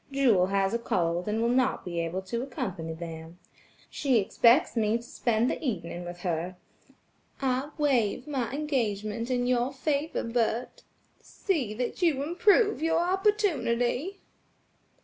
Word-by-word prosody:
Jewel 240 -10 +3
has 195 0 +1
a 235 - +1
cold 175 -5 -1
and 220 +2 0
will 235 - +2
not 255 +1 +1
be 170 -2 -3
able 170 +3 -2
to 235 +5 -3
accompany 195 -11 -4
them. 165 0 -8 0.5
She 270 -4 +2
expects 235 +8 +4
me 220 0 +2
to 235 - -11
spend 235 -1 0
the - - -2
evening 175 - -3
with 175 0 -8
her. 175 0 -2 0.8
I 265 +1 0
waive 250 -6 +1
my 265 -6 -2
engagement 235 -6 -2
in 245 -1 +1
your 250 +1 +1
favor, 285 +3 -1
Bert; 230 +1 -1 0.4
see 275 - -2
that 250 - -3
you 305 -6 +2
improve 410 +5 +3
your 325 0 +2
opportunity." 365 - +1
240 Hz, 140 wpm, -28 LUFS, 195-280 Hz, 0.8 s, expects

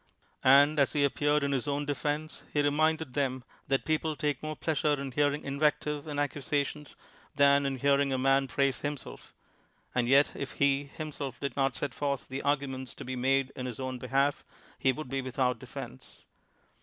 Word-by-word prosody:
And 145 +3 +6
as 140 - +3
he 145 -1 +3
ap 140 - 0
peared 145 0 +2
in 140 - 0
his 135 +1 -1
own 145 0 -1
defense, 150 +2 -2
he 145 - +1
reminded 155 -1 +1
them 130 -2 -1 0.2
that 135 0 +1
people 155 0 0
take 145 -3 -1
more 155 0 -4
pleasure 150 -2 0
in 140 -1 -4
hearing 145 +2 +1
invec 145 +2 +2
tive 150 0 -4
and 145 -1 -3
accusations 145 +1 -2 0.4
than 140 0 +5
in 135 - -1
hearing 140 +1 +2
a 130 - +1
man 135 +1 +3
praise 135 0 +1
himself; 145 -2 -6 0.6
and 125 -1 +1
yet 140 +3 +5
if 140 - -5
he, 140 0 +2
himself, 140 -2 -6
did 140 -3 -3
not 135 -2 +1
set 140 -4 -3
forth 140 0 -2
the 135 +1 -4
arguments 135 -3 -2
to - - -9
be 130 +1 -4
made 135 +1 +1
in 130 0 -4
his 125 -1 -6
own 130 -1 -4
behalf, 135 +3 +1 0.4
he 130 - +3
would 155 +3 -6
be 135 +1 -2
without 130 -1 0
defense. 65 - -10
140 Hz, 190 wpm, -30 LUFS, 135-145 Hz, 0.6 s, And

